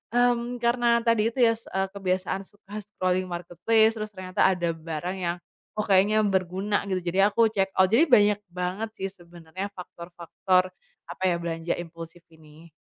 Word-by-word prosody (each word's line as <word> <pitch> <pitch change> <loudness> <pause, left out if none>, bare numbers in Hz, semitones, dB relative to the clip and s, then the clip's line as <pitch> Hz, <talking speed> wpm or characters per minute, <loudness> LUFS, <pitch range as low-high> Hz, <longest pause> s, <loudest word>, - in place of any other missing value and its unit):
mmm, 245 0 +2
karena 235 0 +3
tadi 230 -2 +3
itu 260 - -7
ya, 230 - +6
s 230 - -19
eee, 190 0 0
kebiasaan 190 0 -2
suka 205 +1 -10
scrolling 185 -2 -1
marketplace, 180 +6 +1
terus 215 0 -5
ternyata 185 0 +1
ada 180 -3 +1
barang 165 +3 -5
yang, 175 -1 -1 0.4
"Oh, 215 - -1
kayaknya 205 +2 +3
berguna," 190 +1 0
gitu, 185 -1 -1
jadi 195 +2 +4
aku 225 -1 +3
checkout. 190 -2 +2
Jadi 280 +10 +5
banyak 210 -6 +5
banget 180 +5 -3
sih 195 - -4
sebenarnya 175 +1 -8
faktor-faktor, 180 +1 -2 0.4
apa 190 - -8
ya, 175 - +2
belanja 165 0 -2
impulsif 165 0 -9
ini. 160 +1 -17
190 Hz, 160 wpm, -26 LUFS, 175-215 Hz, 0.4 s, ya